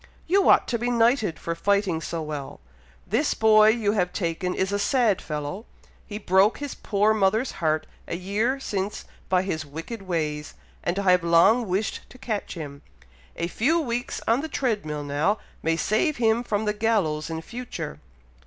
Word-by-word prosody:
"You 385 +3 +3
ought - - +5
to 235 - 0
be 240 +1 -1
knighted 230 - +2
for 170 - -3
fighting 200 -2 +1
so 165 0 -4
well! 150 -3 -6 0.5
This - - +1
boy 215 -1 +6
you 220 -2 +3
have 180 -4 0
taken 180 0 -2
is 190 +1 0
a 205 - 0
sad 225 -3 +2
fellow! 150 +8 -5 0.4
He 205 - -5
broke 195 +1 +3
his 285 -2 -5
poor 210 +1 +1
mother's 215 +4 +1
heart 155 -2 0 0.2
a - - -3
year 210 +9 -1
since 200 -5 -3 0.2
by 185 -1 +3
his 160 -5 -2
wicked 165 +10 -7
ways, 155 -5 -3 0.3
and 175 +2 -1
I 195 -2 +3
have 180 -1 +3
long 170 +8 +4
wished 195 +4 -2
to - - -14
catch 220 -7 -4
him. 145 -4 -7 0.5
A 170 - -2
few 265 - +1
weeks 245 -5 -3
on 230 +4 +3
the 320 - -5
tread 225 - -1
mill 150 -1 -3
now, 145 +9 +1 0.2
may 165 0 +1
save 220 - +1
him 230 0 +2
from 215 -2 -1
the 210 - +1
gallows 200 -9 0
in 160 0 -3
future." 240 - -6
200 Hz, 180 wpm, -25 LUFS, 165-225 Hz, 0.5 s, boy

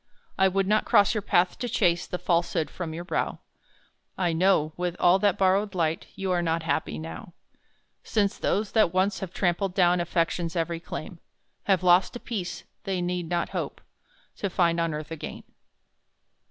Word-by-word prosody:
I 190 - +4
would 195 +1 +1
not 215 +2 +2
cross 205 -3 +4
your 215 - -1
path 180 -2 +2
to 245 - -3
chase 175 -6 +1
The 180 - -3
falsehood 170 -3 0
from 175 -3 -5
your 165 +2 -5
brow 175 - -2 0.8
I 175 -3 +1
know, 160 -3 +2
with 175 -1 -2
all 180 +2 +5
that 205 -1 +2
borrowed 195 +1 +2
light, 165 -2 -1
You 190 -1 -2
are 175 -1 +2
not 165 -1 0
happy 120 - -1
now: 80 +1 -8 0.7
Since 200 -2 0
those 205 +1 0
that 215 -6 +3
once 190 +1 +2
have 190 -3 -5
trampled 185 +1 0
down 180 -1 +4
Affection's 170 0 -1
early 170 0 -1
claim, 170 0 -7 0.5
Have 190 -3 +2
lost 180 +5 +4
a - - -5
peace 175 -8 -5 0.2
they 195 -3 -2
need 175 -1 -2
not 175 -1 0
hope - - -4 0.6
To 200 - -2
find 170 -2 +2
on 165 -2 0
earth 155 +1 -7
again. 160 - -7
180 Hz, 175 wpm, -26 LUFS, 170-195 Hz, 0.8 s, all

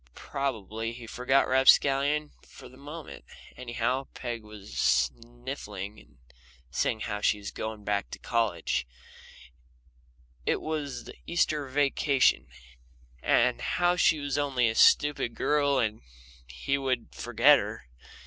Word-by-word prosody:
Probably 115 -4 -4
he 120 0 -10
forgot 125 +4 +1
Rapscallion 140 +3 +4
for - - -14
the 130 - -16
moment. 145 +4 -9 0.3
Anyhow, 125 +2 -2
Peg 120 -2 -5
was 105 -2 -12
sniffling 105 - -2
and - - -21 0.5
saying 110 - -1
how 105 -2 -3
she 105 - +2
was 105 0 -7
going 110 -1 -6
back 100 -1 -1
to - - -7
college 85 - -1 1.6
it - - 0
was 145 -6 -4
the - - -10
Easter 155 -4 0
vacation 140 - +2 0.7
and 125 +1 +2
how 175 0 +1
she 165 -2 +4
was 145 0 -2
only 135 -4 +1
a 115 - 0
stupid 145 -1 +4
girl 145 -2 +2
and 110 -3 -1 0.5
he 65 - -2
would 125 - -2
forget 65 - +4
her. - - -6
125 Hz, 125 wpm, -28 LUFS, 110-140 Hz, 1.6 s, Rapscallion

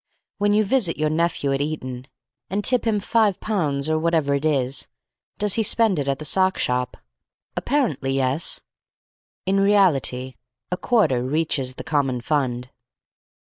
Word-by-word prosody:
When 205 0 +2
you 210 +1 +3
visit 205 -5 +1
your 155 0 0
nephew 155 -4 0
at 135 - -1
Eton, 130 -4 -4 0.4
and 200 +2 -2
tip 250 +1 +2
him 215 -2 +2
five 210 -1 +1
pounds 150 -10 -1
or 155 0 +1
whatever 160 -3 +1
it 140 +1 -1
is, 135 -3 0 0.5
does 210 -2 +1
he 225 - +2
spend 220 -4 +2
it 140 - -2
at 135 -1 0
the 155 - -6
sock 190 +4 +3
shop? 125 0 -1 0.6
Apparently, 205 - 0
yes. 135 +4 0 0.8
In 195 +1 +2
reality, 155 -11 +2 0.3
a 180 - -1
quarter 170 - +2
reaches 135 -1 -1
the - - -7
common 140 -5 0
fund. 125 -2 -2
155 Hz, 150 wpm, -22 LUFS, 135-195 Hz, 0.8 s, you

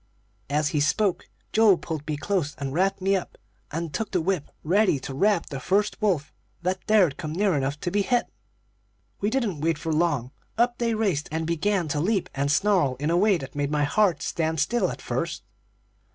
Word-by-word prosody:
"As 150 +1 +1
he 150 - 0
spoke, 190 +6 +1 0.2
Joe 215 -4 +6
pulled 155 -3 -6
me 150 -1 -2
close, 165 -2 -1
and 135 -2 -4
wrapped 190 +4 +1
me 195 +1 +3
up, 185 - -4 0.3
then 165 +1 -3
took 220 +8 -3
the 180 - 0
whip, 175 -3 -1
ready 185 -2 +3
to 135 - -6
rap 200 +5 +2
the 135 - -6
first 205 - 0
wolf 180 -9 0 0.3
that 185 +1 -1
dared 195 -9 +4
come 155 -4 -5
near 195 +2 +2
enough 140 +1 -1
to 175 - -2
be 205 - +2
hit. 245 +4 +1 0.9
We 205 - 0
didn't 220 - -1
wait 165 0 -1
long; 155 -6 0 0.3
up 240 +1 +2
they 230 -2 +1
raced, 195 -10 0
and 160 +1 -2
began 170 +2 0
to 145 - -1
leap 195 +4 0
and 140 +1 0
snarl 180 -6 +2
in 150 +4 -1
a - - +2
way 200 +1 +4
that 135 -4 -8
made 145 -1 -1
my 150 -1 +1
heart 185 +4 +2
stand 160 -1 -1
still, 235 +12 +1
at - - -7
first. - - -3
170 Hz, 195 wpm, -25 LUFS, 150-205 Hz, 0.9 s, Joe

